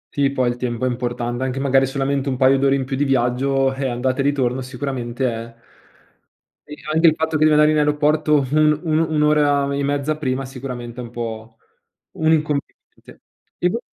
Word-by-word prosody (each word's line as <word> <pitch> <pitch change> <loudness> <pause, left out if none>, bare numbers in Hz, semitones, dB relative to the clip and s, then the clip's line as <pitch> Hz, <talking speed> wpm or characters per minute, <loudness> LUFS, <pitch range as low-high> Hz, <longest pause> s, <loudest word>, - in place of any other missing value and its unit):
Sì, 140 -1 +2
poi 130 -2 0
il 120 - -3
tempo 125 0 -3
è - - +2
importan 120 0 -3
anche 130 0 -2
magari 135 -1 +2
solamente 140 0 -1
un 130 - -2
paio 135 +1 +4
d'ore 135 0 +3
in 135 -1 -2
più 135 +1 -3
di 140 - 0
viaggio, 135 +1 +1
eh, 135 0 -3
andata 130 +2 -2
e - - +3
ritorno 130 -2 0
sicuramente 130 -1 -4
è 115 0 -5 1.1
E 150 - -8 0.2
anche 160 +2 +4
il 160 - +4
fatto 160 0 -2
che 155 - +2
devi 155 - +5
andare 150 0 +5
in 155 - +1
aeroporto 150 0 +2
un 150 0 +3
un 155 -2 +1
un'ora 150 -3 +2
e 140 - -1
mezza 145 +2 -1
prima 135 -2 -2
sicuramente 125 -2 -7
è - - -6
un 120 - -9
po' 115 -1 -6 0.6
un 160 0 +1
inconveniente. 150 -3 -3 0.4
E 180 - +1
vo 230 - -2
135 Hz, 195 wpm, -20 LUFS, 125-150 Hz, 1.1 s, devi